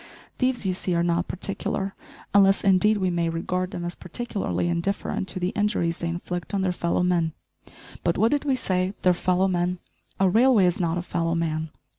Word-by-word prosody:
Thieves, 255 -4 +1
you 185 - +1
see, 180 -1 -1
are 170 - +2
not 175 +1 +1
particular, 195 +1 -3 0.4
unless, 195 -1 +5
indeed, 200 +2 +4
we 185 -2 0
may 170 -1 0
regard 180 +2 -2
them 175 -2 -5
as 175 - -3
particularly 200 -1 -3
indifferent 175 +2 -2
to 185 - -3
the 180 0 0
injuries 195 -5 0
they 170 - -2
inflict 175 +3 -4
on 195 - 0
their 185 - +1
fellow 175 0 0
men 170 -3 +1 0.7
but, 170 - +1
what 220 +4 +3
did 290 -1 +1
we 275 -3 +1
say? 185 -5 -1
their 180 - +5
fellow 185 +2 +1
men? 180 0 0 0.4
a 195 - +4
railway 225 +1 +5
is 180 -1 +1
not 170 -1 0
a 175 - -2
fellow 165 -1 -1
man. 160 -1 -1
180 Hz, 195 wpm, -25 LUFS, 170-195 Hz, 0.7 s, unless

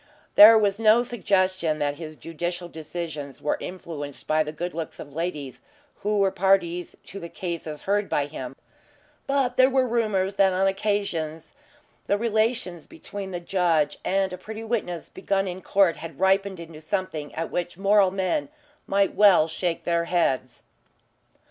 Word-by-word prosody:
There 220 +2 +10
was 205 -1 +1
no 225 +2 +5
suggestion 185 -8 0
that 145 -1 -1
his 155 -2 -8
judicial 175 +5 -5
decisions 155 -4 -7
were 150 - -1
influenced 155 -6 -7
by 155 0 +2
the 150 -1 -2
good 175 +3 -5
looks 165 0 -6
of 145 -2 -9
ladies 150 -5 -4 0.4
who 210 +1 -1
were 195 -1 +3
parties 180 -2 +1
to 195 - -9
the 170 - -8
cases 165 -5 -5
heard 205 +1 0
by 145 - +1
him, 135 -3 -7 0.7
but 275 -3 0
there 255 0 +6
were 260 -1 +2
rumours 210 -5 0
that 195 -1 +4
on 190 +1 +2
occasions 195 -6 -2 0.5
the 200 - +2
relations 215 -6 -1
between 205 -12 -8
the 180 -2 -4
judge 170 -4 +1
and 195 0 0
a 180 - -7
pretty 220 +4 -7
witness 210 -7 -3
begun 195 -1 -1
in 185 +1 -5
court 190 -4 +3
had 165 -4 -9
ripened 190 0 +2
into 165 -2 -10
something 160 -4 -3
at 165 +1 -3
which 175 0 -3
moral 200 0 +4
men 195 +11 -1 0.4
might 195 0 +2
well 195 -6 +6
shake 165 +1 -2
their 170 -1 +1
heads. 135 -8 0
185 Hz, 160 wpm, -25 LUFS, 165-200 Hz, 0.7 s, There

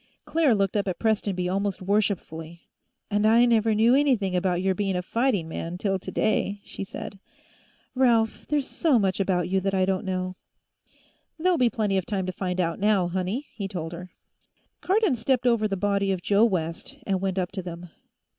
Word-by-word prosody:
Claire 310 -7 +3
looked 195 -1 0
up 205 -1 0
at 185 - -2
Prestonby 200 -5 0
almost 195 +1 -1
worshipfully. 180 -5 -2 0.5
"And 205 +1 +1
I 230 +2 +6
never 225 -2 +3
knew 225 +3 +4
anything 250 -10 +2
about 180 -1 +1
your 190 +1 +1
being 195 0 -1
a 180 - -1
fighting 230 -5 0
man, 165 +2 -5
till 195 0 -1
today," 205 +1 -1
she - - -6
said. 195 0 -8 0.7
"Ralph, 235 -4 +2
there's 290 -2 +1
so 310 -7 +2
much 195 -3 +1
about 180 -3 +1
you 190 +1 +1
that 195 +1 -1
I 185 -1 +3
don't 190 -1 -1
know." 185 -1 -3 1.0
"There'll 360 +2 +2
be 245 -2 +4
plenty 210 -4 0
of 180 - -7
time 195 -3 -1
to 185 - -2
find 185 0 -3
out, 170 -2 0
now, 200 -3 +2
honey," 190 +10 -2
he 200 -3 -4
told 170 -4 -5
her. 180 +1 -8 0.7
Cardon 395 -3 +2
stepped 250 +1 0
over 230 -3 +3
the 195 -2 -2
body 200 0 +1
of 185 -2 -3
Joe 205 +2 +4
West 180 - -3
and 190 -2 0
went 195 -1 -1
up 185 -1 -1
to 190 - -4
them. 175 -1 -8
195 Hz, 190 wpm, -25 LUFS, 185-225 Hz, 1.0 s, I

